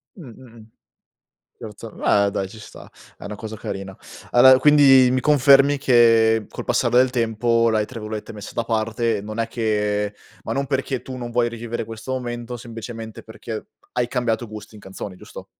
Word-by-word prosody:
Mh, 165 -7 -11
mh-mh. 115 -3 -16 1.0
Certo, 110 +1 -9
beh, 100 -1 +2
dai 95 - -2
ci 110 - -13
sta, 105 - -13 0.3
è - - -13
una 105 - -6
cosa 110 +1 -7
carina. 95 -1 -7 0.4
Allora, 130 +1 +7
quindi 135 -3 +6
mi 130 - +1
confermi 140 0 +5
che, 115 -4 +4
col - - -7
passare 120 - +1
del 130 0 +5
tempo, 115 -1 +1
l'hai, 110 -1 +1
tra 115 -1 -9
virgolette, 110 0 -6
messa 105 -1 -9
da 115 - -2
parte. 115 -1 -1
Non 110 +2 -8
è 115 - 0
che 105 -3 -1 0.3
ma - - -4
non 140 0 -1
perché 135 -1 -2
tu 130 - -8
non 120 -1 -6
vuoi 120 0 +1
rivivere 120 0 -5
questo 115 +3 -9
momento, 120 -1 -5
semplicemente 115 -1 -9
perché 110 0 -8 0.3
hai 120 -1 -1
cambiato 120 -2 -1
gusti 105 0 -10
in 105 - -12
canzoni, 95 0 -8
giusto? 90 - -12
115 Hz, 175 wpm, -22 LUFS, 110-125 Hz, 1.0 s, Allora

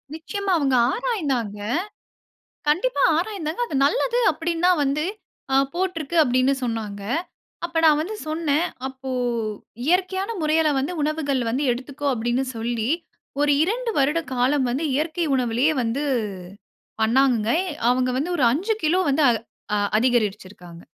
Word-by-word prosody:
நிச்சயமா 395 +5 -3
அவுங்க 275 -4 +1 0.2
ஆராய்ந்தாங்க. 275 - -2 1.1
கண்டிப்பா 370 +12 +2
ஆராய்ந்தாங்க. 345 -1 -3
அது 310 - -7
நல்லது 485 +6 +1
அப்பிடின்னுதான் 335 +2 +1
வந்து 285 +3 0 0.5
அ - - +5 0.2
போட்டுருக்கு. 345 -3 -2
அப்படின்னு 255 0 +2
சொன்னாங்க. 215 -4 -4 0.6
அப்ப 335 -1 -2
நான் 305 -2 +6
வந்து 400 +8 -4
சொன்னேன். 310 0 +1 0.2
அப்போ 265 0 -8 0.8
இயற்கையான 375 +4 +1
முறையில 310 +1 +3
வந்து 280 +6 -1
உணவுகள் 290 -3 0
வந்து 260 +5 -1
எடுத்துக்கோ! 270 +4 -6
அப்பிடின்னு 240 +2 0
சொல்லி, 230 0 -2 0.5
ஒரு 290 0 +4
2 460 +7 0
வருட 295 +4 +2
காலம் 260 +2 +2
வந்து 270 +6 -1
இயற்கை 315 +3 -1
உணவிலே 245 0 +1 0.2
வந்து 235 +5 -1 1.0
பண்ணாங்கங்க. 235 -1 +3 0.4
அவுங்க 255 +1 +2
வந்து 305 +7 -1
ஒரு 275 - +1
5 385 - 0
கிலோ 340 +4 +3
வந்து 290 +2 +2
அ 225 -2 -3 0.2
அதிகரிச்சிருக்காங்க. 200 -7 -1
290 Hz, 125 wpm, -23 LUFS, 245-335 Hz, 1.1 s, நான்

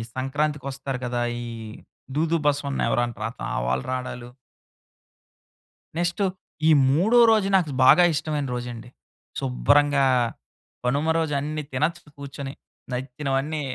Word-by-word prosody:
సంక్రాంతికోస్తారు 135 -1 -2
కదా! 120 0 -1 0.2
ఈ - - -6 0.7
దూదు 165 +2 +2
బసవన్న 140 -1 0
ఎవరంటరా 120 -2 -1
తా - - -4 0.2
వాళ్ళు 65 +1 0
రావడాలు. 125 -1 -5 1.7
నెక్స్ట్ 175 +3 -1 0.5
ఈ - - +6 0.2
మూడో 185 - +3
రోజు 215 -3 +3
నాకు 175 -6 +2
బాగా 180 - +8
ఇష్టమైన 150 -1 -2
రోజండి. 120 -1 -6 0.5
శుభ్రంగా 140 - +3 0.8
కనుమ 140 +5 +1
రోజు 160 -2 0
అన్ని 150 +2 -3
తినచ్చు 155 +5 -2
కూర్చొని 140 -1 -7 0.4
నచ్చినవన్నీ. 135 +4 -2
140 Hz, 105 wpm, -24 LUFS, 125-155 Hz, 1.7 s, బాగా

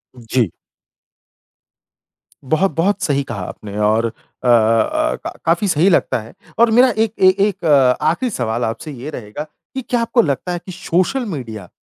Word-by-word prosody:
उ, 125 - -13
जी। 120 -6 +2 1.9
बहुत, 160 +8 +1
बहुत 185 +5 +1
सही 140 -1 +1
कहा 100 -4 -4
आपने 100 +2 -8
और 105 +2 +2
अ 115 - -2 0.4
अ, 115 -1 +3
क - - -1 0.2
काफ़ी 170 +5 +2
सही 175 +1 +3
लगता 175 - +2
है। 110 - -13 0.3
और 235 -1 +5
मेरा 250 +3 +6
1 220 -1 +1
ए 185 - +7 0.2
1 195 -3 -5 0.4
आखिरी 165 +12 +1
सवाल 115 - -2
आपसे 115 +7 -5
ये 135 +2 -7
रहेगा 120 -1 -6
कि 210 - -10
क्या 240 -1 +1
आपको 230 +1 +3
लगता 150 - -2
है 175 - -2
कि 185 - -7
सोशल 185 +7 0
मीडिया 110 - -6
155 Hz, 165 wpm, -18 LUFS, -, 1.9 s, ए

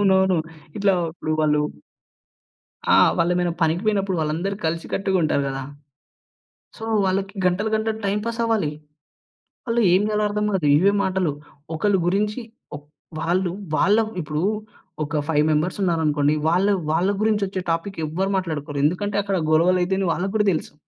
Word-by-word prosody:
అవునవును. 190 -2 +3 0.4
ఇట్లా 200 -1 +3 0.2
ఇప్పుడు 155 -1 -5
వాళ్ళు 150 -1 +2 1.3
ఆ! - - +7 0.2
వాళ్ళేమైనా 175 +1 +1
పనికి 165 +3 +1
పోయినప్పుడు 195 -3 +1
వాళ్ళందరూ 160 +6 -1
కలిసికట్టుగా 190 +4 -1
ఉంటారు 150 -2 +1
గదా! 135 0 -4 1.1
సో, 225 - -8 0.2
వాళ్ళకి 195 +1 -1
గంటలు 195 +5 0
గంటలు 220 0 -1
టైమ్ 200 +1 0
పాస్ 230 0 -3
అవ్వాలి. 220 -9 +1 1.0
వాళ్ళు 235 0 +1
ఏం 185 - +5
జేయాలో 210 0 0
అర్థం 210 0 -1
గాదు. 185 -6 0
ఇవే 195 +6 +4
మాటలు 190 -3 0 0.4
ఒకరి 195 +4 +2
గురించి 210 +6 0 0.3
ఓ - - -3 0.4
వాళ్ళు 175 +2 0 0.2
వాళ్ళ 200 +8 +4 0.2
ఇప్పుడు 150 0 -3 0.6
ఒక 150 +1 -2
5 150 -2 +3
మెంబర్స్ 155 +5 0
ఉన్నారనుకోండి, 155 -4 +2
వాళ్ళు 185 +5 +3 0.2
వాళ్ళగురించి 205 +4 +1
ఒచ్చే 190 -1 -4
టాపిక్ 170 +4 -3
ఎవరు 185 +6 -2
మాట్లాడుకోరు. 155 -5 -3
ఎందుకంటే 195 +6 0
అక్కడ 195 -1 -1 0.2
గొడవలు 180 +3 +4
అయితాయని 190 +1 0
వాళ్ళకి 190 +4 -2
గూడా 210 -1 +2
దెలుసు. 155 - -4
185 Hz, 140 wpm, -22 LUFS, 160-200 Hz, 1.3 s, ఆ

